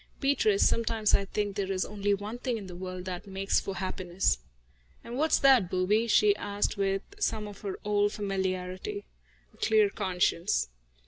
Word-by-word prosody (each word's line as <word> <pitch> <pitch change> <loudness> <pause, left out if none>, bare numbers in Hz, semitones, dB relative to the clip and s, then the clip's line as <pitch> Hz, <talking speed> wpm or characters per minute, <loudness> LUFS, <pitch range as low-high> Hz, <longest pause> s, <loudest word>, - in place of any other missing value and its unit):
"Beatrice, 395 +9 +3
sometimes 225 -2 +1
I 200 - +4
think 205 0 -2
that 200 -2 -1
there - - -3
is 185 - 0
only 205 0 0
one 210 +4 -6
thing 250 -2 -1
in 205 - -7
the 180 -2 -9
world 185 0 -6
that 185 +1 -5
makes 195 0 +1
for 195 - -5
happiness." 185 - -1 0.6
"And 235 - -7
what's 310 +4 +3
that, 260 -9 +5
booby?" 205 +6 +2
she 410 - +5
asked, 205 +1 -1
with 195 -1 0 0.2
some 215 - -1
of 205 -1 -11
her 195 -2 -4
old 205 0 +2
familiarity. 190 - -3 0.5
"A - - -22
clear 215 -2 +3
conscience." 180 - 0
200 Hz, 175 wpm, -29 LUFS, 185-220 Hz, 0.6 s, that